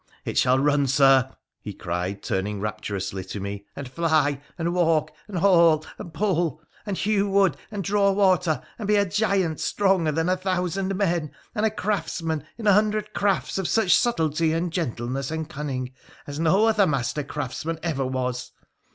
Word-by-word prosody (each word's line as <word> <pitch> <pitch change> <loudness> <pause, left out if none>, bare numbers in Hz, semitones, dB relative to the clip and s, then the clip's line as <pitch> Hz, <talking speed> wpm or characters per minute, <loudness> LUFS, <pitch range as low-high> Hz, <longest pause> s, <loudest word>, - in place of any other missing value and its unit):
It - - -3
shall 130 0 +4
run, 145 0 +2
Sir,' 135 -1 +5 0.3
he 105 - -6
cried, 90 +3 -4
turning 100 +2 -2
rapturously 100 -2 -4
to 95 +2 -6
me 100 +1 -5
— - - -44
' - - -45
and 140 - -6
fly, 150 -1 +1 0.2
and 170 0 -1
walk, 165 -3 +2 0.2
and 200 -4 -5
haul, 170 -4 +4
and 170 - -8
pull, 175 -6 0 0.3
and 195 -3 -2
hew 205 -1 +1
wood 195 -6 +3
and 205 -2 -4
draw 200 +2 +2
water, 185 -7 +2 0.2
and 210 - -4
be 210 - +3
a 200 0 +3
giant 195 -5 0
stronger 190 -6 +1
than 165 +2 0
a 185 - +3
thousand 185 +1 -1
men, 175 -5 0 0.2
and 220 -1 +1
a - - +1
craftsman 180 -7 -2
in 225 - -7
a 205 - +6
hundred 210 +1 +1
crafts 195 -4 0
of 190 - -1
such 220 -4 +1
subtilty 160 -7 +1
and 170 0 -2
gentleness 130 -4 -2
and 160 0 -4
cunning 135 -4 -4 0.3
as 145 +1 -6
no 180 +7 +3
other 215 -3 +4
master 140 +1 -1
craftsman 150 +3 -4
ever 155 -6 -1
was. 125 -1 -3
165 Hz, 175 wpm, -24 LUFS, 135-195 Hz, 0.3 s, a